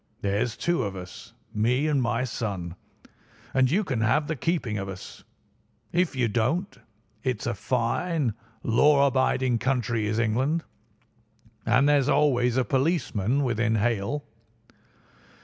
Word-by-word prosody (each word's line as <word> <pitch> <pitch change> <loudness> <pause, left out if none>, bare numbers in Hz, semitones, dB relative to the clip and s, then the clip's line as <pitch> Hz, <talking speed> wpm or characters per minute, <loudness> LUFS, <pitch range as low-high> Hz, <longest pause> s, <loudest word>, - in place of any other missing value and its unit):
There's 105 +4 -1
two 175 0 0
of 100 -2 -3
us, 90 -1 -10 0.2
me 125 +7 +1
and 150 -3 +2
my 120 +1 0
son, 100 -8 -4 0.8
and 130 -1 +3
you 195 +9 +2
can 130 - -2
have 140 +8 +2
the 160 - -2
keeping 135 - -1
of 95 0 -5
us. 95 -1 -9 0.7
If 175 -3 +1
you 125 -2 +2
don't—it's 115 - -3
a - - 0
fine, 125 - -1 0.3
law 140 +5 +4
abiding 130 -2 +1
country 120 -4 0
is 110 +1 -1
England, 130 +9 +1 1.0
and 135 +3 +4
there's 145 -3 +3
always 125 -4 +3
a 130 - +2
policeman 135 - +1
within 115 -2 +1
hail. 115 +6 -1
125 Hz, 130 wpm, -26 LUFS, 110-140 Hz, 1.0 s, law